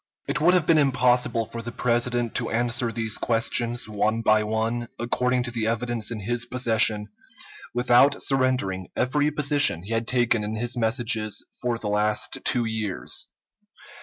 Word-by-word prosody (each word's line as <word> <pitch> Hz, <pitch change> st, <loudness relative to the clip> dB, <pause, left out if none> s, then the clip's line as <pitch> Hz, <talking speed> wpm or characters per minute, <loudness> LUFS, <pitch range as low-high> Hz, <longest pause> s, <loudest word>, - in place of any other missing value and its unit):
It 150 Hz, -, -2 dB
would 175 Hz, +3 st, +5 dB
have 175 Hz, -4 st, +2 dB
been 160 Hz, -1 st, +4 dB
impossible 125 Hz, -4 st, +2 dB
for 115 Hz, +1 st, -7 dB
the 120 Hz, +1 st, -7 dB
President 120 Hz, -1 st, 0 dB
to -, -, -2 dB
answer 120 Hz, 0 st, 0 dB
these 115 Hz, -1 st, -3 dB
questions, 120 Hz, +1 st, 0 dB
one 110 Hz, +2 st, -1 dB
by 110 Hz, -1 st, +3 dB
one, 110 Hz, +2 st, -2 dB
according 125 Hz, +1 st, 0 dB
to 120 Hz, -, -4 dB
the 115 Hz, -2 st, -2 dB
evidence 115 Hz, -1 st, -1 dB
in 115 Hz, -3 st, -5 dB
his 120 Hz, +3 st, -1 dB
possession, 110 Hz, -4 st, +1 dB, 0.7 s
without 125 Hz, +3 st, +4 dB
surrendering 130 Hz, -9 st, 0 dB
every 145 Hz, +4 st, +1 dB
position 145 Hz, -, +3 dB
he 110 Hz, +4 st, -5 dB
had 115 Hz, 0 st, -1 dB
taken 120 Hz, -3 st, +1 dB
in 105 Hz, +1 st, -4 dB
his 120 Hz, +3 st, -2 dB
messages 110 Hz, -2 st, 0 dB, 0.2 s
for 120 Hz, -2 st, -1 dB
the 110 Hz, -, -5 dB
last 105 Hz, +1 st, 0 dB
two 120 Hz, -2 st, +1 dB
years. 110 Hz, -4 st, -3 dB
120 Hz, 160 wpm, -24 LUFS, 110-125 Hz, 0.7 s, would